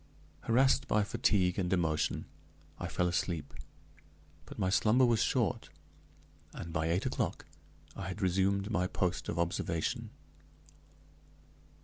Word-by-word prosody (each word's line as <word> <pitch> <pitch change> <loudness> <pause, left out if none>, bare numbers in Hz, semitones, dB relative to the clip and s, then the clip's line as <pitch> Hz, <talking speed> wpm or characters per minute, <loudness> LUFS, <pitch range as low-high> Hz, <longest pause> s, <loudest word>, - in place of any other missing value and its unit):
Harassed 130 +3 +3
by 105 0 +2
fatigue 95 -2 +1
and 90 -2 -1
emotion 80 -4 0 0.5
I - - -3
fell 90 - 0
asleep, 85 -4 -2 0.9
but - - -10
my 95 -3 0
slumber 115 +6 +4
was 115 -2 +3
short, 120 -3 0 0.9
and 85 0 -7
by 80 -1 0
eight 85 +3 0
o'clock - - -2 0.5
I - - -5
had 95 +2 -5
resumed 100 +2 +1
my 90 -3 +1
post 90 -1 -2
of - - -3
observation. 85 -1 -1
95 Hz, 120 wpm, -32 LUFS, 85-105 Hz, 0.9 s, slumber